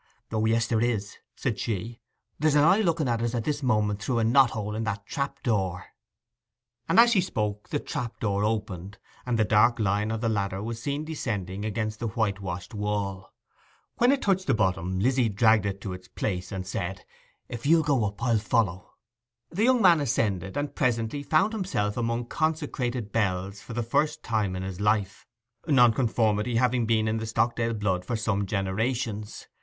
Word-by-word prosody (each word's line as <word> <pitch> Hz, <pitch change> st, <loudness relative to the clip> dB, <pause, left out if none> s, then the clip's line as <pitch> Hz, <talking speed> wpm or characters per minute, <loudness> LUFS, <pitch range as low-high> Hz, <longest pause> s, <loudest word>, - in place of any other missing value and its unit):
'O 110 Hz, -1 st, 0 dB
yes, 115 Hz, +1 st, +2 dB
there 115 Hz, -1 st, 0 dB
is,' 110 Hz, -4 st, -1 dB, 0.2 s
said -, -, -2 dB
she. 115 Hz, +2 st, -3 dB, 0.4 s
'There's 155 Hz, 0 st, +3 dB
an 145 Hz, -, +5 dB
eye 190 Hz, +7 st, +5 dB
looking 165 Hz, -7 st, +1 dB
at 115 Hz, -1 st, 0 dB
us 120 Hz, +1 st, -1 dB
at 115 Hz, -, -1 dB
this 150 Hz, +2 st, -2 dB
moment 105 Hz, -5 st, +1 dB
through 120 Hz, +3 st, -1 dB
a 115 Hz, -, +2 dB
knot 125 Hz, +3 st, +5 dB
hole 105 Hz, -1 st, -4 dB
in 110 Hz, +1 st, -2 dB
that 100 Hz, -2 st, -3 dB
trap 140 Hz, -1 st, -4 dB
door.' 95 Hz, -, 0 dB, 1.0 s
And -, -, +5 dB
as 235 Hz, 0 st, +7 dB
she 200 Hz, -5 st, +4 dB
spoke 105 Hz, -, -3 dB
the 145 Hz, -, -1 dB
trap 120 Hz, -4 st, -4 dB
opened, 100 Hz, -2 st, -1 dB, 0.3 s
and 120 Hz, -2 st, +1 dB
the 110 Hz, -, +3 dB
dark 110 Hz, +3 st, +4 dB
line 105 Hz, 0 st, 0 dB
of 110 Hz, 0 st, -2 dB
the 115 Hz, -, 0 dB
ladder 100 Hz, -2 st, -1 dB
was 115 Hz, +1 st, -5 dB
seen 145 Hz, +3 st, -2 dB
descending 105 Hz, -, -4 dB
against 110 Hz, 0 st, -3 dB
the 115 Hz, -, -2 dB
white 110 Hz, -3 st, -1 dB
washed 90 Hz, -1 st, -6 dB
wall. 100 Hz, -3 st, -3 dB, 0.7 s
When 245 Hz, +2 st, +4 dB
it 275 Hz, -1 st, 0 dB
touched 190 Hz, -2 st, +1 dB
the 135 Hz, -, +3 dB
bottom 95 Hz, -3 st, 0 dB
Lizzy 125 Hz, +2 st, +2 dB
dragged 110 Hz, 0 st, +3 dB
it 100 Hz, 0 st, -3 dB
to 95 Hz, -, -4 dB
its 90 Hz, 0 st, -10 dB
place, 90 Hz, 0 st, -3 dB
and 95 Hz, -2 st, -4 dB
said, 95 Hz, -1 st, -4 dB, 0.4 s
'If 120 Hz, +3 st, -5 dB
you'll 160 Hz, +1 st, +5 dB
go 140 Hz, -6 st, +2 dB
up, 105 Hz, +3 st, -5 dB
I'll 115 Hz, -3 st, +3 dB
follow.' 105 Hz, -5 st, -1 dB, 0.6 s
The 200 Hz, +7 st, +1 dB
young 250 Hz, -3 st, +4 dB
man 175 Hz, -4 st, +7 dB
ascended, 100 Hz, -7 st, -1 dB
and 145 Hz, 0 st, -2 dB
presently 120 Hz, +1 st, 0 dB
found 170 Hz, +9 st, +2 dB
himself 180 Hz, -, -1 dB
among 115 Hz, 0 st, -1 dB
consecrated 130 Hz, -7 st, -2 dB
bells 100 Hz, -2 st, -1 dB
for 115 Hz, -, -9 dB
the 120 Hz, +1 st, -1 dB
first 150 Hz, +7 st, 0 dB
time 105 Hz, -5 st, -1 dB
in 95 Hz, -, -4 dB
his 95 Hz, -1 st, -6 dB
life, 105 Hz, -2 st, 0 dB, 0.4 s
nonconformity 120 Hz, -4 st, +3 dB
having 120 Hz, -1 st, +2 dB
been 110 Hz, -1 st, +2 dB
in 110 Hz, +1 st, 0 dB
the 110 Hz, 0 st, -4 dB
Stockdale 115 Hz, 0 st, 0 dB
blood 95 Hz, -4 st, -1 dB
for 115 Hz, -, -3 dB
some 105 Hz, -3 st, -1 dB
generations. 105 Hz, +2 st, -2 dB
110 Hz, 185 wpm, -27 LUFS, 100-125 Hz, 1.0 s, as